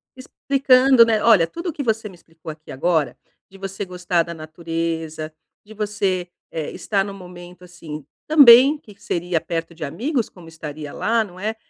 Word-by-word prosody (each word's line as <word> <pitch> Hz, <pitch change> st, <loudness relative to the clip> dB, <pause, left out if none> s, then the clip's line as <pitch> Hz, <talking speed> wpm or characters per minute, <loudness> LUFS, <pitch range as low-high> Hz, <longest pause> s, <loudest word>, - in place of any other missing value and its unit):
Explicando, 260 Hz, -1 st, +4 dB
né. 220 Hz, -2 st, +1 dB
Olha 215 Hz, -8 st, +6 dB
tudo 340 Hz, -, -5 dB
o 320 Hz, -, -4 dB
que 285 Hz, -, -4 dB
você 225 Hz, -3 st, -1 dB
me 190 Hz, -, -14 dB
explicou 165 Hz, -2 st, -11 dB
aqui 155 Hz, 0 st, -13 dB
agora, 160 Hz, +2 st, 0 dB, 0.3 s
de 195 Hz, -, -15 dB
você 195 Hz, 0 st, -5 dB
gostar 180 Hz, -1 st, 0 dB
da 170 Hz, -, -7 dB
natureza, 160 Hz, -1 st, -5 dB, 0.3 s
de 220 Hz, -, -13 dB
você, 205 Hz, -4 st, -2 dB, 0.2 s
eh, 160 Hz, -2 st, -4 dB
estar 200 Hz, -2 st, -1 dB
no 200 Hz, 0 st, -7 dB
momento, 180 Hz, -1 st, -12 dB
assim, 160 Hz, -5 st, -9 dB, 0.2 s
também 280 Hz, -1 st, +8 dB
que 215 Hz, -8 st, -17 dB
seria 175 Hz, -5 st, -1 dB
perto 165 Hz, +1 st, -4 dB
de 160 Hz, -, -8 dB
amigos, 235 Hz, -, -2 dB
como 175 Hz, -3 st, -15 dB
estaria 150 Hz, -2 st, -8 dB
lá, 230 Hz, 0 st, +1 dB
não 185 Hz, -3 st, -12 dB
é? 215 Hz, +3 st, -2 dB
180 Hz, 175 wpm, -21 LUFS, 165-225 Hz, 0.3 s, também